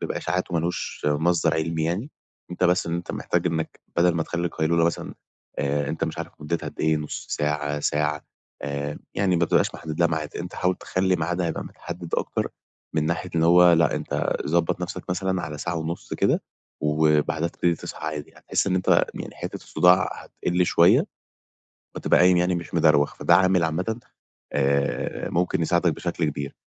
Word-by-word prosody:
بيبقى -, -, -3 dB
إشاعات 90 Hz, +1 st, -2 dB
وما 85 Hz, -, +1 dB
لوش 85 Hz, -3 st, -3 dB
مصدَر 80 Hz, +4 st, +2 dB
علمي 80 Hz, 0 st, -1 dB
يعني، 100 Hz, -, -2 dB, 0.4 s
أنت 90 Hz, +1 st, -1 dB
بس 90 Hz, -1 st, +3 dB
أنت 85 Hz, +1 st, -3 dB
محتاج -, -, -1 dB
إنك 80 Hz, -2 st, -2 dB, 0.2 s
بدَل 85 Hz, 0 st, +4 dB
ما 85 Hz, -, +1 dB
تخلّي 85 Hz, +1 st, -2 dB
القيلولة 85 Hz, 0 st, +1 dB
مثلًا 85 Hz, -, -2 dB, 0.4 s
آآ 70 Hz, +1 st, 0 dB
أنت -, -, -1 dB
مش -, -, -5 dB
عارف -, -, -5 dB
مُدّتها 80 Hz, +3 st, -2 dB
قد -, -, -9 dB
إيه، 80 Hz, 0 st, +3 dB
نُص 75 Hz, -1 st, -5 dB
ساعة، 75 Hz, 0 st, -1 dB
ساعة 75 Hz, 0 st, 0 dB, 0.4 s
آآ، 70 Hz, +1 st, -3 dB, 0.2 s
يعني 95 Hz, -3 st, +2 dB
ما 85 Hz, -, +3 dB
بتبقاش -, -, +2 dB
محدّد 80 Hz, +1 st, -6 dB
لها 85 Hz, -, +5 dB
ميعاد، 80 Hz, -2 st, -3 dB
أنت 90 Hz, +1 st, -6 dB
حاول 90 Hz, 0 st, +1 dB
تخلّي 95 Hz, 0 st, 0 dB
ميعادها 85 Hz, +2 st, -1 dB
يبقى 80 Hz, -, -4 dB
متحدّد 85 Hz, -1 st, -6 dB
أكتر -, -, -1 dB, 0.5 s
من 80 Hz, -1 st, +1 dB
ناحية 85 Hz, +2 st, -2 dB
إن 80 Hz, -, +3 dB
هو، 90 Hz, +1 st, +7 dB
لأ 85 Hz, 0 st, +4 dB
أنت -, -, -1 dB
ضبّط 85 Hz, +3 st, +1 dB
نَفْسك 90 Hz, 0 st, -5 dB
مثلًا 95 Hz, 0 st, -1 dB
على 75 Hz, 0 st, -5 dB
ساعة 85 Hz, +3 st, -2 dB
ونُص 80 Hz, +1 st, -4 dB
كده -, -, +2 dB, 0.4 s
وبعدها 75 Hz, +1 st, +2 dB
تبتدي 85 Hz, 0 st, 0 dB
تصحى -, -, -7 dB
عادي 75 Hz, -1 st, -4 dB
يعني، -, -, -20 dB
هتحس -, -, +1 dB
إن 95 Hz, -, +1 dB
أنت 90 Hz, -, +4 dB
يعني -, -, -7 dB
حِتّة -, -, -5 dB
الصُّداع 90 Hz, +1 st, +3 dB
هتقِل 90 Hz, 0 st, -1 dB
شوية، -, -, +5 dB, 0.9 s
وتبقى -, -, +3 dB
قايم 90 Hz, 0 st, +6 dB
يعني 90 Hz, +1 st, +2 dB
مش 85 Hz, 0 st, -5 dB
مدروَخ، 75 Hz, -3 st, +4 dB
فده 85 Hz, -, +4 dB
عامل 95 Hz, -2 st, +3 dB
عامةً 90 Hz, +9 st, -2 dB, 0.5 s
آآ 70 Hz, +1 st, 0 dB
ممكن 85 Hz, -1 st, +1 dB
يساعدك 85 Hz, 0 st, +2 dB
بشكل 85 Hz, -2 st, -2 dB
كبير. 70 Hz, -2 st, -3 dB
85 Hz, 180 wpm, -24 LUFS, 75-90 Hz, 0.9 s, هو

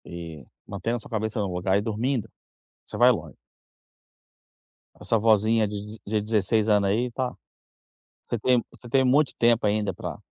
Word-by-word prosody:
E 85 Hz, -5 st, -8 dB, 0.2 s
mantendo 115 Hz, +4 st, -2 dB
a -, -, -8 dB
sua -, -, -14 dB
cabeça 110 Hz, 0 st, -2 dB
no 100 Hz, -3 st, -2 dB
lugar 95 Hz, +2 st, +1 dB
e -, -, +1 dB
dormindo, 115 Hz, +2 st, -2 dB, 0.6 s
você -, -, -8 dB
vai -, -, +6 dB
longe. -, -, -3 dB, 1.6 s
Essa 115 Hz, -, +1 dB
vozinha 110 Hz, 0 st, +3 dB
de 105 Hz, +1 st, -7 dB
de 105 Hz, +1 st, 0 dB
16 105 Hz, 0 st, +1 dB
anos 100 Hz, -2 st, +3 dB
aí 120 Hz, +5 st, 0 dB
tá 125 Hz, +1 st, -3 dB, 0.9 s
você 120 Hz, -, -3 dB
tem 125 Hz, +2 st, +2 dB
você 120 Hz, -, -14 dB
tem 130 Hz, +2 st, +3 dB
muito 135 Hz, +3 st, +3 dB
tempo 115 Hz, -1 st, +3 dB
ainda 105 Hz, 0 st, 0 dB
pra -, -, -7 dB
110 Hz, 160 wpm, -25 LUFS, 100-120 Hz, 1.6 s, vai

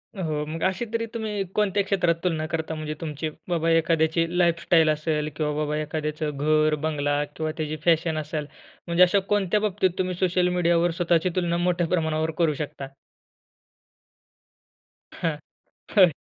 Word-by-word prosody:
हो, 155 Hz, -5 st, -2 dB
मग 160 Hz, +2 st, -6 dB
अशी 190 Hz, +5 st, 0 dB
तरी 230 Hz, 0 st, 0 dB
तुम्ही 215 Hz, -3 st, -2 dB
कोणत्या 205 Hz, -1 st, +2 dB
क्षेत्रात 180 Hz, -4 st, +1 dB
तुलना 160 Hz, -3 st, 0 dB
करता 160 Hz, 0 st, -3 dB
म्हणजे 155 Hz, -1 st, -4 dB
तुमची 155 Hz, 0 st, -3 dB, 0.2 s
बाबा 165 Hz, -1 st, +1 dB
एखाद्याची 165 Hz, 0 st, +2 dB
लाईफस्टाईल 170 Hz, -2 st, +3 dB
असेल 155 Hz, 0 st, 0 dB
किंवा 150 Hz, -1 st, -1 dB
बाबा 150 Hz, 0 st, -1 dB
एखाद्याचं 150 Hz, -1 st, -3 dB
घर, 155 Hz, +1 st, +3 dB
बंगला 145 Hz, -1 st, 0 dB
किंवा 155 Hz, -1 st, -2 dB
त्याची 155 Hz, -1 st, -2 dB
फॅशन 165 Hz, -1 st, +2 dB
असेल. 150 Hz, 0 st, -3 dB, 0.4 s
म्हणजे 170 Hz, +1 st, +5 dB
अशा 195 Hz, +3 st, +4 dB
कोणत्या 205 Hz, 0 st, +2 dB
बाबतीत 195 Hz, -3 st, +1 dB
तुम्ही 185 Hz, -1 st, -1 dB
सोशल 180 Hz, -1 st, +2 dB
मीडियावर 170 Hz, 0 st, +3 dB
स्वतःची 175 Hz, +1 st, +2 dB
तुलना 170 Hz, -1 st, 0 dB
मोठ्या 175 Hz, -1 st, +1 dB
प्रमाणावर 160 Hz, -2 st, 0 dB
करू 165 Hz, -3 st, +2 dB
शकता? 140 Hz, -1 st, -5 dB, 2.3 s
हां. 165 Hz, -3 st, -2 dB, 0.6 s
होय. 185 Hz, -4 st, +7 dB
165 Hz, 145 wpm, -25 LUFS, 155-180 Hz, 2.3 s, होय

